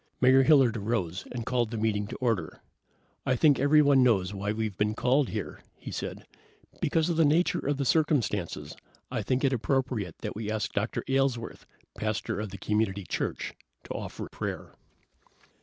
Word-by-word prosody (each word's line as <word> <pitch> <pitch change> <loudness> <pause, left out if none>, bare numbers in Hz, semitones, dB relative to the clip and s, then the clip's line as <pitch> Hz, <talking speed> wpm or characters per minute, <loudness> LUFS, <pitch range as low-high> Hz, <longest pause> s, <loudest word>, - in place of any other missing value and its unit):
Mayor 130 +1 +6
Hilliard 135 -5 +5
arose 100 -5 -2
and 120 -2 -4
called 120 -3 0
the 115 - -4
meeting 105 -2 0
to - - -6
order. 115 -10 -2 0.6
"I 130 - +1
think 145 +3 +4
everyone 145 -1 +5
knows 100 -7 +3
why 100 +1 -2
we've 110 -2 -2
been 105 +2 0
called 130 +3 +2
here," 105 -8 -5 0.2
he - - -8
said. - - -5 0.6
"Because 160 0 +2
of 165 - -1
the 165 - +5
nature 155 +4 +3
of 145 0 -1
the 140 - -1
circumstances 125 - 0 0.4
I 120 -3 -1
think 130 +5 0
it 135 -1 +3
appropriate 125 - -1
that - - -4
we 110 0 -4
ask 110 -1 -2
Dr. 100 +3 -1
Aylesworth, 135 -3 -1 0.3
pastor 110 -1 -2
of 105 -1 -3
the 100 - -8
Community 105 -2 0
Church, - - -3 0.3
to - - -6
offer - - -6
prayer." - - -5
115 Hz, 170 wpm, -28 LUFS, 105-135 Hz, 0.6 s, Mayor